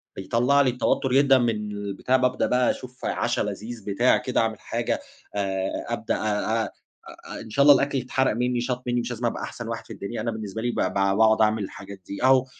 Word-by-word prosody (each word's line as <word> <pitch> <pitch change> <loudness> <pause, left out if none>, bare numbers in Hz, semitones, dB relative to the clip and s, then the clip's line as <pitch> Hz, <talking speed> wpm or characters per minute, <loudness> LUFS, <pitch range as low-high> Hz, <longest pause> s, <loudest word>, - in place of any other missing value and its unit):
بيطلَّع 120 +8 +2
لي 130 - +3
التوتر 125 +1 0
جدًا 135 -1 +6
من 120 -2 +2 0.2
البتاع، 100 +5 0
بابدأ 125 0 +1
بقى 125 0 +3
أشوف 130 0 -9
عشا - - 0
لذيذ 115 -1 -5
بتاع 110 +5 +3
كده 125 - 0
أعمل 110 -2 -1
حاجة، 120 - -2 0.4
آآ، 95 -1 -2
أبدأ - - -1
آآ، 110 +1 0
آآ، - - -13 0.5
إن 110 - -10
شاء 140 +6 +2
الله 145 -1 +9
الأكْل 140 +1 +1
يتحرق 130 0 0
مني 125 0 0
شاط 125 0 -2
مني 120 0 +1
مش 120 +1 -4
لازم 120 0 -2
أبقى - - -2
أحسن 115 -1 -6
واحد 115 0 -5
في - - -9
الدنيا، 100 +3 -5
أنا 115 +1 -1
بالنسبة 110 0 -5
لي 120 - 0
ب - - -5
ب - - 0
باقعد 100 +3 +3
أعمل 110 -1 +2
الحاجات 100 0 -9
دي، 100 - -6
أهو 130 0 +5
115 Hz, 210 wpm, -25 LUFS, 105-125 Hz, 0.5 s, الله